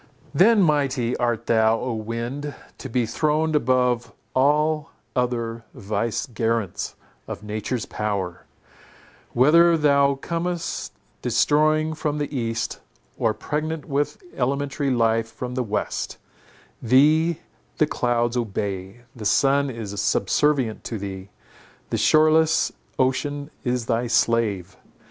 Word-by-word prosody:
Then 210 +2 +5
mighty 140 -6 +1
art 120 -1 -1
thou, 110 0 +3
O 125 -1 -2
wind, 115 +6 -4 0.2
to 135 - -7
be 125 0 +1
throned 155 +6 0
above 125 -3 +1 0.2
all 150 +3 +2 0.3
other 115 -2 -1
vicegerents 110 -2 -2 0.3
of - - -6
nature's 110 +3 -3
power; 100 -5 -3 0.9
whether 165 +6 +5
thou 140 -2 +3
comest 170 +4 -3 0.3
destroying 150 +6 +2
from 150 -1 -2
the 145 0 -3
east, 115 -2 -2 0.4
or 110 -2 +1
pregnant 155 +3 -3
with 145 0 -1 0.2
elementary 140 +2 -1
life 115 -2 +1
from 125 +3 -6
the 130 - -1
west; 105 -3 -3 0.6
thee 150 +7 +4 0.4
the 155 - +4
clouds 120 -4 0
obey; 100 -2 -3
the 115 - -8
sun 140 +6 +3
is 105 -5 -5
subservient 120 +4 +1
to 115 - -3
thee; 95 -1 -7 0.6
the - - +1
shoreless 155 +1 +4 0.3
ocean 145 +3 -1
is 125 -2 -1
thy 115 +2 0
slave! 110 -5 +1
125 Hz, 110 wpm, -23 LUFS, 115-145 Hz, 0.9 s, Then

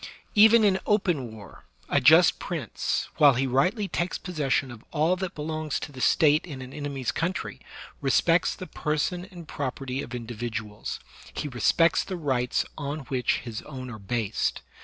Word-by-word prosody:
Even 220 +2 +7
in 195 -2 +3
open 175 - +1
war, 105 -4 -13 0.2
a - - +2
just - - +6
prince, - - -2
while 145 -3 +7
he 135 +3 +1
rightly 180 - +1
takes 175 -2 -2
possession 145 -6 -1
of 115 -2 -11
all 160 +3 +2
that 185 -1 -5
belongs 155 0 -3
to 145 - -7
the 130 -2 -9
State 150 +2 +4
in 145 -7 -8
an 130 0 -9
enemy's 140 -4 -3
country, 170 +4 -3 0.4
respects 165 +5 +3
the 185 - -7
person 160 +3 -2
and 175 -5 -12
property 135 -1 -4
of 125 -3 -7
individuals; 115 -3 -5 0.4
he - - -3
respects 145 +6 +3
the 185 - -5
rights 130 -6 0
on 145 +1 -3
which 125 -2 +1
his 115 -3 -6
own 130 -3 -8
are 110 - -8
based. 110 +1 -2
145 Hz, 160 wpm, -26 LUFS, 125-170 Hz, 0.4 s, Even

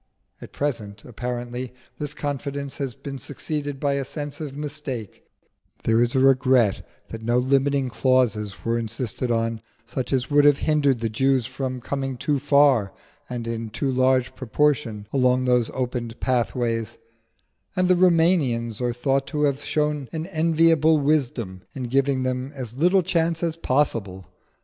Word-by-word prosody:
At - - -10
present, 105 -8 -4
apparently, 120 +1 -5 0.3
this 150 -1 -4
confidence 140 -1 -4
has 135 -4 -3
been 135 0 -7
succeeded 145 +1 -4
by 140 0 +1
a 140 0 -1
sense 145 +2 -6
of 140 -2 -6
mistake: 145 -7 -6 0.6
there 115 +1 +3
is 120 +1 +1
a - - +4
regret 130 -5 +4 0.3
that 115 - -7
no 120 +2 +1
limiting 135 +1 +2
clauses 120 -6 +1
were 115 0 +1
insisted 115 +2 -3
on, 115 -1 0 0.2
such 130 +1 -4
as 130 0 0
would 145 0 +5
have 145 -1 +6
hindered 145 -6 +2
the 115 - 0
Jews 130 +2 +2
from 130 0 -4
coming 135 0 -3
too 145 +3 0
far 140 -7 +4 0.4
and 120 -2 -4
in 115 -1 -3
too 135 +5 -2
large 130 0 +2
proportion 130 -4 0
along 130 -1 +3
those 125 -2 +2
opened 125 -2 -4
pathways; 120 -2 -1 0.8
and 185 -1 +2
the 185 - +5
Roumanians 160 - +2
are 120 -1 0
thought 135 +3 0
to 150 -2 -1
have 140 0 +1
shown 150 -3 -1
an 160 -1 -4
enviable 160 -2 +3
wisdom 130 -10 0
in 130 - -4
giving 135 +1 +1
them 130 +1 -2
as 125 -4 -6
little 180 +6 +3
chance 165 0 0
as 165 -2 0
possible. 115 - -1
130 Hz, 155 wpm, -24 LUFS, 120-145 Hz, 0.8 s, have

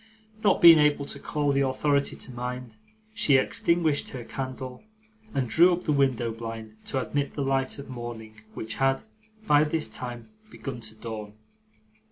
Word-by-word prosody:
Not 205 - +3
being 165 -2 +10
able 150 -1 +3
to 140 - -5
call 145 0 0
the 140 0 +2
authority 140 +2 +1
to - - -7
mind, 125 -1 -5 0.4
she 185 -11 +3
extinguished 160 +2 +1
her 125 -3 -7
candle, 130 0 -6 0.5
and 130 - -1
drew 170 +10 +6
up 175 +1 -3
the 155 - 0
window 130 -5 +2
blind 115 -1 -7
to 135 - -1
admit 140 +2 -2
the 145 - -1
light 135 0 0
of 140 - -8
morning, 115 -3 -8
which 110 0 -5
had, 135 0 +2 0.4
by 150 -5 +5
this 155 +1 -1
time, 120 - -7 0.2
begun 135 - -7
to 110 -1 -4
dawn. 110 -2 -7
135 Hz, 165 wpm, -27 LUFS, 120-145 Hz, 0.5 s, being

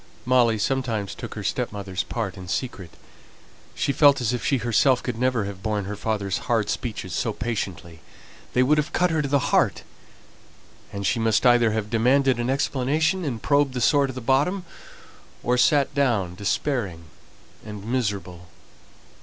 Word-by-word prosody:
Molly 120 -3 +3
sometimes 115 -3 -1
took - - -8
her - - -5
stepmother's 100 -3 -3
part 105 -5 -4
in 95 -2 -10
secret; 95 -4 -4 0.8
she 140 - 0
felt 140 0 +5
as 120 -1 0
if 120 - -3
she 135 - +2
herself 120 +2 +2
could 125 - -3
never 125 -4 +1
have 100 -1 -7
borne 105 -1 -2
her 105 +2 -5
father's 100 -2 -2
hard 115 -3 +1
speeches 105 -7 -4
so 115 +5 -1
patiently; 100 -7 -5 0.5
they 125 - +4
would 150 +4 +3
have 150 - -3
cut 180 -1 +2
her 160 -1 +1
to 145 - -2
the 140 -1 0
heart, - - +2 1.1
and 100 0 -5
she 115 - +1
must 115 +1 +2
either 120 -2 +5
have 110 -1 -3
demanded 125 +2 +3
an 120 +1 -1
explanation, 145 +6 0
and 125 -7 -4
probed 140 -2 +2
the - - -1
sore 140 +2 +3
to 130 - -6
the 130 - -6
bottom, 145 - +1 0.8
or 125 - +2
sat 145 +1 +3
down 115 -11 +1
despairing 100 - -2 0.6
and 105 -2 -8
miserable. 100 -8 -3
120 Hz, 165 wpm, -24 LUFS, 105-135 Hz, 1.1 s, felt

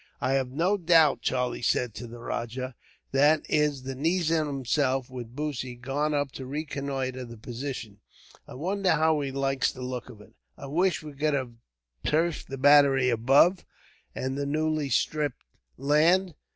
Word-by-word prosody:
"I 130 - 0
have 135 -2 +1
no 170 +10 +1
doubt," 165 -5 +4
Charlie 125 -2 -1
said 120 -1 +1
to 120 - -7
the 120 +1 -10
rajah, 120 +2 -4 0.4
"that 145 +3 +4
is 150 -3 +1
the 135 0 -4
nizam 160 +2 +1
himself, 135 -1 0
with 120 -2 -8
Bussy, 135 -4 -4
gone 140 +5 -1
up 145 -2 -1
to 130 - -8
reconnoitre 135 -3 -3
the 115 -1 -10
position. 120 -2 -6 0.5
I - - -10
wonder 190 +6 0
how 160 0 +2
he 140 - -2
likes 135 0 0
the 130 - -9
look 125 -1 -5
of 105 - -12
it. 105 - -17 0.2
I - - -9
wish 170 +5 +1
we 150 -1 -8
could 150 +1 0
have 130 -3 -2 0.5
turfed 160 +1 0
the 135 - -6
battery 135 -2 +5
above, 135 - +4 0.5
and 130 +1 -3
the 140 0 -2
newly 155 0 0
stripped 150 +1 0 0.3
land. 160 +7 +3
140 Hz, 165 wpm, -27 LUFS, 130-155 Hz, 0.5 s, battery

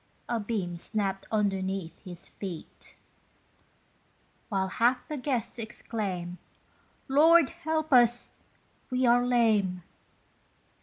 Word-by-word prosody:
A 235 - -1
beam 200 -5 -3
snapped 195 +1 -2
underneath 195 -5 -1
his 175 -3 -11
feet, 185 -5 -8 1.5
While 190 -3 0
half 240 +6 +1
the 305 - -4
guests 250 -4 -2
exclaim, 190 -5 -4 0.7
"Lord 310 +2 +5
help 315 -3 -2
us! 240 -1 +4 0.6
we 255 0 +1
are 240 0 +5
lame." 215 -7 +2
220 Hz, 95 wpm, -28 LUFS, 190-250 Hz, 1.5 s, Lord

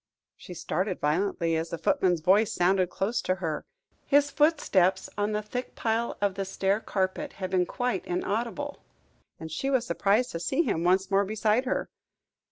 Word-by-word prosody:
She 180 - -10
started 185 +4 -2
violently 165 +2 0
as 160 +1 -2
the 170 - -4
footman's 175 +1 +1
voice 195 +6 +4
sounded 185 0 +2
close 205 +6 -1
to 185 - 0
her. 165 -4 -4 0.4
His 285 0 +4
footstep 205 - +3 0.2
on 205 +1 0
the 210 0 -1
thick 245 +4 -5
pile 230 +1 -1
of 205 -1 +1
the 195 +1 -3
stair 195 +1 0
carpet 190 -3 -2
had 185 -1 -5
been 180 -2 +2
quite 245 -6 -2
inaudible, 230 +10 -3 0.6
and 160 0 -7
she 270 - -2
was 260 -3 +1
surprised 215 +3 +1
to 165 - -4
see 265 - +1
him 165 - -1
once 190 +2 +2
more 195 +1 +4
beside 215 +4 +1
her. 255 - -1
195 Hz, 175 wpm, -27 LUFS, 180-230 Hz, 0.6 s, voice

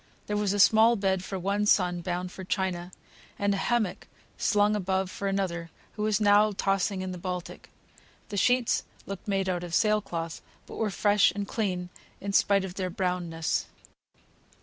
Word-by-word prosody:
There 210 - -2
was 205 -2 +1
a 205 - 0
small 220 +3 +6
bed 190 -3 0
for 195 - -4
one 200 +3 0
son, 180 -3 +3
bound 180 +1 -3
for 190 - -8
China; 180 -1 -2 0.5
and 200 0 +1
a - - -1
hammock 220 -3 -1 0.3
slung 210 0 +2
above 190 -1 -1
for 200 - -4
another, 180 -4 -2 0.2
who 210 - -7
was 210 -1 +1
now 210 0 +5
tossing 195 0 0
in 185 - -4
the 180 - -6
Baltic. 180 -1 -6 0.6
The - - -5
sheets 245 +3 +2 0.2
looked 195 0 -7
made 195 -1 0
out 180 -1 -1
of 175 -1 -3
sail 215 +3 +3
cloth, 165 -4 -5 0.2
but - - -10
were 220 - 0
fresh 205 +1 +4
and 200 -1 -3
clean 185 -6 -2 0.3
in 200 0 -4
spite 200 -1 +3
of 185 - -7
their 185 -1 -3
brownness. 175 -3 -1
195 Hz, 175 wpm, -28 LUFS, 180-205 Hz, 0.6 s, small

